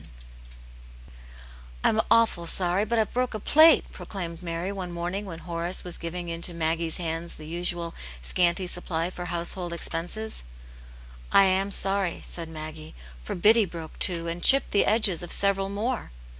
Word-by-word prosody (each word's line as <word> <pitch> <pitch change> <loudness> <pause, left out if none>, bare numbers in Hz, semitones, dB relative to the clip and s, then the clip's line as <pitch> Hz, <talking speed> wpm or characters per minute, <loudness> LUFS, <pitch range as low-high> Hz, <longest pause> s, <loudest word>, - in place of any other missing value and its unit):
T - - -17 1.8
'M 220 - +3
awful 225 -7 +2
sorry, 185 +3 +1
but 235 +2 -1
I've 220 -2 0
broke 250 -2 -1
a - - -3
plate," 315 +9 +6
pro - - -12
A - - -7
claimed 170 -4 -6
Mary 170 +2 -4
one 185 -3 -6
morning, 175 +4 -4
when 175 -4 -8
Horace 170 +1 +3
was 175 -1 -3
giving 175 +1 -6
into 170 +1 -2
Maggie's 165 0 -1
hands 165 0 -4
the 155 - -11
usual 170 +1 -2 0.3
scanty 175 - +1
supply 175 -1 -2
for 175 -1 -7
household 175 0 -2
expenses. 175 - -2 0.9
"I 195 - +6
am 190 +1 +2
sorry," 195 -2 +1
said 165 -2 -2
Maggie. 155 0 -9 0.3
"For - - -5
Biddy 215 +4 +4
broke 165 -3 -10
two, 170 -2 -1
and 170 +1 -5
chipped 275 0 +6
the 200 - +3
edges 210 -6 +2
of 175 - -2
several 195 -1 +2
more." 220 +5 -3
175 Hz, 165 wpm, -26 LUFS, 170-200 Hz, 1.8 s, plate